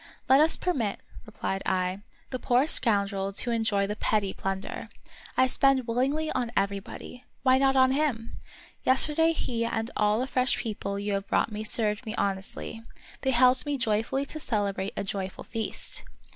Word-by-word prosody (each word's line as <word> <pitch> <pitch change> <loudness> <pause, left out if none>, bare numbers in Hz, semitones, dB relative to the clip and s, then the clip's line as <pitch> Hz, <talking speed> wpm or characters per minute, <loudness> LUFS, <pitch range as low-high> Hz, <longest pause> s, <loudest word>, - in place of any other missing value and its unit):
" - - -33
Let 265 +2 +6
us 320 +1 +4
permit," 250 - -1 0.3
replied 195 -2 -3
I, 185 +1 0 0.2
" - - -34
the 255 - -3
poor 245 +3 +3
scoundrel 200 -8 +1
to 240 +4 -1
enjoy 220 -3 +1
the 205 +1 -3
petty 210 -3 0
plunder. 195 0 -4 0.5
I 260 - +6
spend 265 0 +3
willingly 270 +7 0
on 245 -2 -1
everybody; 200 +5 -3 0.2
why 260 -1 +5
not 270 0 +3
on 260 0 +5
him 265 -5 0
1 - - -11 0.6
Yesterday 320 +4 +4
he 235 -7 -1
and 225 0 -2
all 210 +1 +2
the 255 - 0
fresh 255 -1 +1
people 200 -3 -3
you 205 0 -2
have 195 0 -2
brought - - +1
me 215 0 -4
served 215 +1 +1
me 220 - -3
honestly; 195 +2 -3 0.4
they 265 - 0
helped 255 +2 +4
me 290 -1 0
joyfully 230 +4 0
to 310 - -5
celebrate 200 -6 -1
a - - -1
joyful 195 -1 -4
feast." 225 -2 -2
230 Hz, 175 wpm, -27 LUFS, 200-260 Hz, 0.6 s, Let